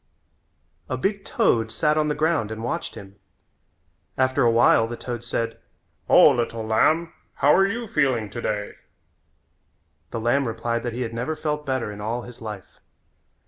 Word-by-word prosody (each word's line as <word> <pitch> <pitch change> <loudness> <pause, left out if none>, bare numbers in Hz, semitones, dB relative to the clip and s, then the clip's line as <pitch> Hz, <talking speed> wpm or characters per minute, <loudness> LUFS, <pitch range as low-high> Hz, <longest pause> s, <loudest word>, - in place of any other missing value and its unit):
A 130 - -1
big 195 +7 -1
toad 115 -1 +1
sat 150 +6 +1
on 155 0 +1
the 150 - 0
ground 155 -7 +1
and 110 0 -6
watched 120 - -3
him. 100 -2 -11 1.0
After 130 0 +2
a 120 - +5
while 115 0 +4
the 120 +1 -6
toad 120 -2 -6
said: 115 -1 -3 0.5
"O, - - +8
little 115 -2 -2
lamb, 160 +10 +2 0.2
how 145 - +4
are 195 +3 +5
you 230 +3 -4
feeling 130 - +1
today?" 105 -1 -3 1.4
The 115 - -4
lamb 120 +4 +1
replied 115 +1 -2
that 120 -1 -4
he 125 - -4
had 115 -2 -3
never 125 +7 -2
felt 150 -1 -3
better 130 -5 -1
in 105 0 -8
all 115 +3 -3
his 120 -1 -12
life. 105 -4 -8
120 Hz, 165 wpm, -24 LUFS, 115-150 Hz, 1.4 s, O